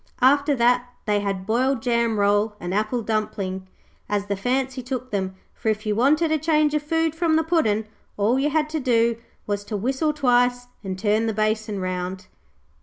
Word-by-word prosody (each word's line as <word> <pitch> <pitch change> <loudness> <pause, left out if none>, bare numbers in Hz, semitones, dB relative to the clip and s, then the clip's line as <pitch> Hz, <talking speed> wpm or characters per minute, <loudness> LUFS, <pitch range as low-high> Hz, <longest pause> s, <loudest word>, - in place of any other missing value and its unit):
After 285 +2 +4
that 245 0 +3 0.2
they 210 -1 +2
had 195 -2 -3
boiled 245 +3 +1
jam 235 -2 +1
roll 205 +1 +2
and 175 -1 -4
apple 215 +4 0
dumpling, 195 -4 -2 0.4
as 205 -1 0
the 200 0 -2
fancy 255 +5 -1
took 255 0 -5
them, 190 -2 -2 0.2
for 220 - -2
if 215 0 -1
you 210 - +1
wanted 300 +8 +3
a 315 - +2
change 305 -1 +2
of 300 - +1
food 325 +1 0
from 325 -1 +1
the 320 - +3
Puddin', 225 -11 +1 0.3
all 220 +6 +2
you 290 +2 +1
had 300 0 +1
to 315 - -1
do 235 -3 +2 0.3
was 205 -1 -2
to 210 - -3
whistle 265 +8 0
twice 245 -3 +2 0.2
and 190 -1 -4
turn 215 +3 +1
the 220 - -1
basin 215 -1 -1
round. 185 0 -4
230 Hz, 185 wpm, -23 LUFS, 205-270 Hz, 0.4 s, After